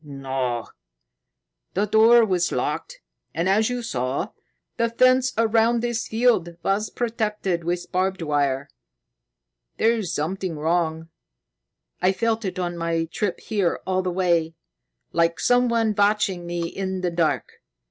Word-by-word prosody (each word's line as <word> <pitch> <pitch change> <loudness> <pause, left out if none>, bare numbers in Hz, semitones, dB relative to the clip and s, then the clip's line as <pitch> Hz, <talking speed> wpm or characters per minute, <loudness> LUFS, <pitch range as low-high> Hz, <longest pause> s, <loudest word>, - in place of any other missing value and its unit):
"No! 135 -4 -3 1.1
The 200 +3 +2
door 225 +2 +6
was 180 -4 0
locked, - - -3 0.3
and, 170 +2 0
as 215 +4 +3
you 245 -1 -3
saw, 130 - -2 0.5
the 230 -1 +1
fence 255 +2 +4
around 230 +1 +3
this 240 -1 -2
field 220 -8 +1
was 205 +2 0
protected 210 -7 -2
with 175 +1 -3
barbed 185 -1 0
wire. 140 -2 0 1.1
There's 220 -5 +1
something 170 +2 -3
wrong. 160 0 -1 0.9
I 185 +1 +3
felt 225 +2 0
it 185 -1 -3
on 175 -1 -3
my 165 0 0
trip 200 0 -2
here 200 -6 0
all 185 0 +1
the 185 - -2
way, 170 -3 +1 0.6
like 170 0 +2
someone 235 -3 +2
watching 200 -4 +1
me 170 -1 -2
in 190 +1 -4
the 180 -1 -1
dark. 170 -2 -1
185 Hz, 130 wpm, -23 LUFS, 170-225 Hz, 1.1 s, door